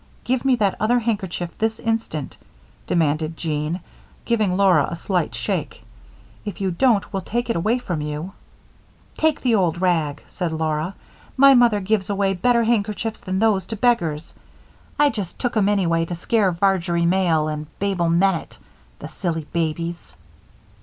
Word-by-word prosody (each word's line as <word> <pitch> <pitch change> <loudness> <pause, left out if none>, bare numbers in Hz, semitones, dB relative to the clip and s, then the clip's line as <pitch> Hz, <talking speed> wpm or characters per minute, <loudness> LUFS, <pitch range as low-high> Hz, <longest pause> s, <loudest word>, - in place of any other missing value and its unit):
"Give 255 0 0
me 265 -2 +4
that 205 -5 +1
other 230 +3 +3
handkerchief 195 -7 -2
this 220 0 0
instant," 225 -11 -3 0.5
demanded 155 -1 0
Jean, 155 +2 -2 0.4
giving 215 -6 +1
Laura 185 -8 +4
a - - -4
slight 180 +1 -1
shake. - - -3 0.6
"If 205 -4 -6
you 190 -2 0
don't, 220 +3 +2
we'll 195 - -1
take 235 +5 -2
it - - -2
away 215 +9 +1
from 175 -10 -4
you." 150 +5 -5 0.8
"Take 315 -2 +1
the 245 -3 +2
old 175 -5 +2
rag," 160 -6 0
said 175 -4 -3
Laura. 160 +2 -2 0.4
"My 275 +1 +8
mother 240 -4 +5
gives 200 0 0
away 200 -1 +1
better 235 +6 +2
handkerchiefs 220 -1 -1
than 190 0 -3
these 200 -3 +2
to 225 - -4
beggars. 175 -10 0 0.6
I 290 -1 +4
just 200 -6 -5
took 245 -1 -2
'em 205 -2 +3
anyway 170 -5 +1
to 175 - -5
scare 195 +3 +1
Varjory 175 -1 +1
Male 170 -4 +2
and 150 0 -4
Babel 190 -4 0
Mennett, 175 0 +1 0.4
the - - -8
silly 165 -4 -3
babies." 165 - -3
190 Hz, 155 wpm, -22 LUFS, 165-220 Hz, 0.8 s, My